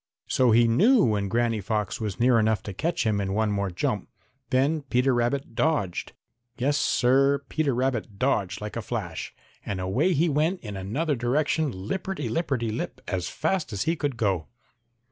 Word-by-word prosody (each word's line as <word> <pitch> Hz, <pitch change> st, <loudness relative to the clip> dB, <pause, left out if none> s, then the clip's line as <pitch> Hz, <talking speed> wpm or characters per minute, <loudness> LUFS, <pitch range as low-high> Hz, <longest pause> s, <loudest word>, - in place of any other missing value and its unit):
So 130 Hz, -1 st, +2 dB
he 115 Hz, +1 st, +5 dB
knew 205 Hz, -, +5 dB
when 105 Hz, -2 st, +1 dB
Granny 115 Hz, +1 st, 0 dB
Fox 105 Hz, +1 st, -2 dB
was 105 Hz, -2 st, -3 dB
near 120 Hz, -1 st, +4 dB
enough 110 Hz, -1 st, +1 dB
to 100 Hz, -, -6 dB
catch 165 Hz, -, -1 dB
him 105 Hz, -2 st, +1 dB
in 95 Hz, 0 st, -2 dB
one 110 Hz, -1 st, +1 dB
more 100 Hz, -1 st, -1 dB
jump. 85 Hz, -, -2 dB, 0.4 s
Then 140 Hz, +5 st, +2 dB
Peter 130 Hz, -1 st, +1 dB
Rabbit 120 Hz, +2 st, -1 dB
dodged. 120 Hz, -, 0 dB, 0.4 s
Yes, 140 Hz, +4 st, +1 dB
Sir, 140 Hz, +1 st, +3 dB
Peter 150 Hz, -5 st, 0 dB
Rabbit 120 Hz, -5 st, -1 dB
dodged 105 Hz, -7 st, 0 dB
like 105 Hz, 0 st, -6 dB
a 115 Hz, -, -2 dB
flash, 105 Hz, -7 st, -5 dB, 0.3 s
and 95 Hz, -, -4 dB
away 95 Hz, -, +1 dB
he 165 Hz, +3 st, +2 dB
went 160 Hz, +5 st, +1 dB
in 105 Hz, -3 st, -7 dB
another 135 Hz, -, -1 dB
direction 140 Hz, +5 st, +1 dB
lipperty 140 Hz, -, -4 dB
lipperty 125 Hz, -7 st, -1 dB
lip, -, -, -4 dB
as 90 Hz, -3 st, -2 dB
fast 160 Hz, +3 st, -1 dB
as 100 Hz, +1 st, -1 dB
he 165 Hz, +4 st, +1 dB
could 145 Hz, -6 st, -2 dB
go. 95 Hz, -7 st, 0 dB
120 Hz, 175 wpm, -26 LUFS, 105-145 Hz, 0.4 s, he